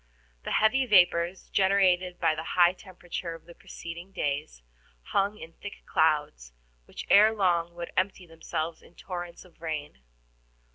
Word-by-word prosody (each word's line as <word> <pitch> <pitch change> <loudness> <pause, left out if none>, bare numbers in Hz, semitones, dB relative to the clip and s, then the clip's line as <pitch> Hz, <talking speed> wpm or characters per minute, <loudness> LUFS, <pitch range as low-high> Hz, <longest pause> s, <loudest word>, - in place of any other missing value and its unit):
The - - -2
heavy 255 +5 +3
vapors, 175 -3 +3
generated 185 -2 +2
by 165 -2 +3
the 155 +1 -5
high 175 0 +6
temperature 180 -3 -7
of 165 - -15
the 170 - -13
preceding 170 +2 -9
days, 140 - -3 0.5
hung 200 +2 +1
in 165 -4 -11
thick 205 +3 -10
clouds, 145 - 0 0.3
which - - -9
ere 215 +2 +7
long 170 -4 +1
would 170 0 -6
empty 190 0 -1
themselves 165 0 -5
in 175 - -20
torrents 175 -1 -7
of 175 -2 -22
rain. 155 - -5
175 Hz, 145 wpm, -28 LUFS, 165-190 Hz, 0.5 s, ere